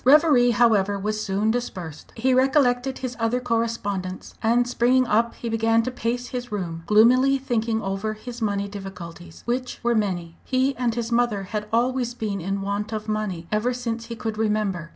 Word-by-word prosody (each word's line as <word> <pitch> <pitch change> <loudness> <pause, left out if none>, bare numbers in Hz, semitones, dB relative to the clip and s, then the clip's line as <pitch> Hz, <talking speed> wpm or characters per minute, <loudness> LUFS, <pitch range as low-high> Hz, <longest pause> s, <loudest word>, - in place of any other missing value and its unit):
Reverie, 280 -3 +6
however, 215 -4 +3
was 215 +2 -2
soon 205 +3 +1
dispersed. 185 -10 -5
He 255 +3 +2
recollected 260 -1 +3
his 255 -1 -4
other 230 +2 +1
correspondents, 225 -6 -2
and 235 +2 +3
springing 250 +1 +3
up 230 +1 +1
he 235 - -6
began 225 0 +2
to 255 - -2
pace 245 0 -2
his 245 -2 -5
room, 170 -5 -3
gloomily 255 +6 +5
thinking 230 -4 -1
over 195 +2 -2
his 240 +2 -9
money 200 -2 0
difficulties, 180 -4 -9
which 250 +1 -2
were 240 0 +3
many. 180 -6 -1
He 265 +1 +1
and 240 -2 0
his 235 -1 -3
mother 235 -4 +1
had 210 +2 -4
always 245 +1 +1
been 205 -5 -3
in 195 +3 -2
want 205 +2 -2
of 215 0 -4
money 210 -6 -2
ever 225 +4 +1
since 230 -2 -3
he 235 - -5
could 220 -1 -4
remember. 210 -6 0
225 Hz, 175 wpm, -24 LUFS, 200-245 Hz, -, Reverie